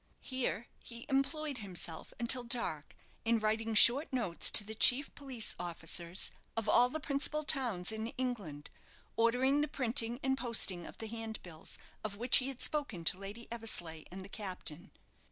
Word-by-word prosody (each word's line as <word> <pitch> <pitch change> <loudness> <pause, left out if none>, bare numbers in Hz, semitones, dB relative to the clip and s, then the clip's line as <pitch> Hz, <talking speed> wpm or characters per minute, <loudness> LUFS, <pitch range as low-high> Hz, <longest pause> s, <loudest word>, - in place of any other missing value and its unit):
Here 255 -3 -3
he 235 -1 -10
employed 275 0 -1
himself 180 -5 -3
until 245 +1 +2
dark 235 - -4 0.3
in 230 0 +1
writing 220 +1 -2
short 255 +8 +7
notes 230 -10 +2
to 210 - +9
the 215 +2 -7
chief 250 +5 +5
police 265 -6 -2
officers 170 +1 -1 0.3
of 225 -1 -1
all 245 +4 +4
the 315 - -5
principal 300 +1 -1
towns 230 -11 +2
in 220 0 -5
England, 205 - -5 0.4
ordering 250 +5 +2
the 300 - -1
printing 245 -4 +1
and 265 0 0
posting 225 -8 0
of - - -12
the 225 - -7
handbills 220 -7 -7 0.3
of 210 -2 -5
which 240 +4 +4
he 260 - -1
had 270 -2 -7
spoken 280 - -2
to 180 +3 +1
Lady 205 +4 -8
Eversleigh 175 -9 -3
and 190 +1 -9
the - - -13
captain. 185 -3 -7
225 Hz, 160 wpm, -32 LUFS, 195-260 Hz, 0.4 s, to